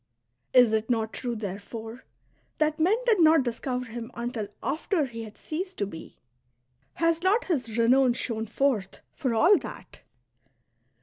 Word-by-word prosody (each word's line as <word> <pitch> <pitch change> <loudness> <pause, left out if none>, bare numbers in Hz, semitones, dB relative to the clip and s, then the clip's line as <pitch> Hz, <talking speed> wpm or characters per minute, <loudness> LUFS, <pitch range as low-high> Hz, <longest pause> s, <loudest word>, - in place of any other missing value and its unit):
" - - -51
Is 245 -3 +7
it 220 +1 0
not 225 -2 0
true, 240 -2 -3
therefore, 220 +3 -7 0.5
that 310 0 +1
men 370 +8 +4
did 450 -5 +3
not 315 -3 +6
discover 250 +1 -3
him 230 0 -7
until 235 -3 -3 0.2
after 310 +3 0
he 230 -3 -7
had 215 - -12
ceased 365 +4 -5
to 200 - 0
be? 160 -5 -10 0.8
Has 330 0 +1
not 405 +6 +2
his 245 - -2
renown 250 +2 +4
shone 225 -2 -3
forth, 220 -6 -1
for 255 -6 -1
all 350 - +6
that 185 - -10
245 Hz, 150 wpm, -27 LUFS, 225-310 Hz, 0.8 s, Is